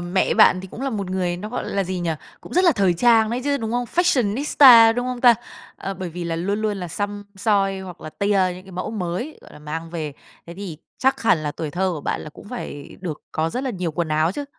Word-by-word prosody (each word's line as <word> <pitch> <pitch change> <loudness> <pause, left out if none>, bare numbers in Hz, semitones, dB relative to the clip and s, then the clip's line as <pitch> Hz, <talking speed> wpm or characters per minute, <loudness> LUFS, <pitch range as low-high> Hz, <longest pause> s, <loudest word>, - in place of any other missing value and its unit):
mẹ 175 +2 +1
bạn 185 - +6
thì 190 - -9
cũng - - -9
là 275 - -1
một 200 -4 -3
người, 180 -2 -1
nó, 210 +4 -6
gọi 245 - -4
là 195 -1 0
gì 185 0 -3
nhỉ, 170 -1 -1 0.3
cũng - - -12
rất 365 +2 +3
là 340 - +6
thời 195 -7 +2
trang 225 +2 +4
đấy 245 +2 -1
chứ, 285 -1 +1
đúng 225 -3 -4
hông? 245 0 0
Fashionista, 250 - +6
đúng 245 +1 -2
hông 250 -1 -4
ta? 240 -2 +7 0.4
Ờ, 195 0 -5
bởi 185 0 -5
vì 175 +1 -6
là 165 -1 -2
luôn 200 +5 -1
luôn 210 -2 0
là 180 -2 -5
xăm 205 +3 -4
soi 195 -2 +1
hoặc 180 -3 -9
là 155 - -8
tia 200 +1 +1
những 185 - -11
cái 190 - -13
mẫu 185 +4 -4
mới, 200 - -4
gọi - - -16
là, - - -12
mang 160 +2 -6
về. 155 -4 -4 0.3
Thế 170 - -9
thì 180 -5 -7 0.2
chắc 265 +1 +1
hẳn 220 -7 +4
là 145 -1 -2
tuổi 155 -2 -5
thơ 185 +3 0
của 155 - -5
bạn - - -2
là 155 - -8
cũng 205 - -14
phải 145 - -7
được 170 -5 -5
có 160 +1 0
rất 255 +7 -3
là 260 - -1
nhiều 180 -6 -3
quần 170 0 -2
áo 155 +3 +2
chứ, 290 - -4
195 Hz, 265 wpm, -22 LUFS, 175-230 Hz, 0.4 s, ta